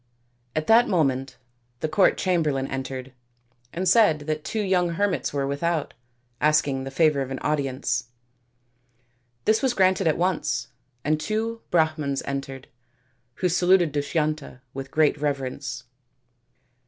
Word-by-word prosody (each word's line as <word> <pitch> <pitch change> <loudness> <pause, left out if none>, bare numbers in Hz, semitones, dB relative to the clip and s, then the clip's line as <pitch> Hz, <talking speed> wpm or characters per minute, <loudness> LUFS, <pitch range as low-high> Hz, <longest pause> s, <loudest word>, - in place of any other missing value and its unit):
At 155 0 0
that 230 +5 +6
moment 135 -7 0 0.4
the - - 0
court 185 +5 +3
chamberlain 155 -7 +1
entered 130 -1 -5 0.6
and 185 +3 -2
said 180 -6 +5
that 155 0 -3
two 220 - -2
young 185 -3 +2
hermits 200 +1 0
were 140 -1 -1
without, 150 +3 -1 0.5
asking 145 -3 +2
the - - -4
favour 150 0 +2
of 130 - -3
an 135 - -4
audience. 135 -4 -1 1.4
This 220 +1 +3
was 260 -3 +1
granted 190 -1 +3
at 155 - +2
once, 180 0 -1 0.3
and 155 +1 +1
two 225 +5 -2
Brahmans 155 -4 +1
entered, 135 -1 -5 0.7
who 185 - 0
saluted 180 -1 +3
Dushyanta 150 -2 -2
with 135 0 -6
great 155 0 +2
reverence. 135 -4 -3
155 Hz, 130 wpm, -25 LUFS, 135-180 Hz, 1.4 s, that